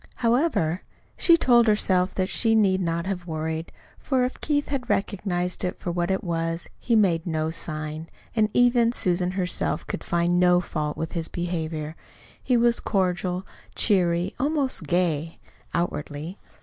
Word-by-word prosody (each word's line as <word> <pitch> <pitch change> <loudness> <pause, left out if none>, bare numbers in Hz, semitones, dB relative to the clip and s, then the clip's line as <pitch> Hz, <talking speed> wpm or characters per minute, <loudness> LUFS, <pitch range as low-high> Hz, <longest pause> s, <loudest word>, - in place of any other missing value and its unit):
However, 230 - +1 0.3
she 335 -2 +5
told 240 -6 +4
herself 190 -3 +2
that 185 -1 0
she 225 +3 +2
need 190 -3 +3
not 170 -1 -1
have 185 -2 -4
worried, 160 0 -3 0.3
for 260 -2 +1
if 255 - -6
Keith 290 -1 0
had 275 -3 -3
recognized 180 -3 -1
it 180 - -2
for 175 - -4
what 175 +1 -1
it 190 0 0
was, 165 -1 -2
he 235 - +1
made 180 -6 +2
no 160 -1 -1
sign; 155 0 -4 0.3
and 215 -2 +3
even 240 0 +4
Susan 180 -3 +1
herself 185 -2 -1
could - - -5
find 175 +1 +1
no 180 0 +5
fault 150 -4 -3
with 160 - -3
his 165 -2 -2
behavior. 160 -3 -4 0.5
He 250 - +2
was 235 0 +3
cordial, 185 -2 -1 0.3
cheery, 180 -3 +2
almost 280 -1 0
gay, 165 -3 0 0.3
outwardly. 160 +1 -3
180 Hz, 150 wpm, -25 LUFS, 165-215 Hz, 0.5 s, she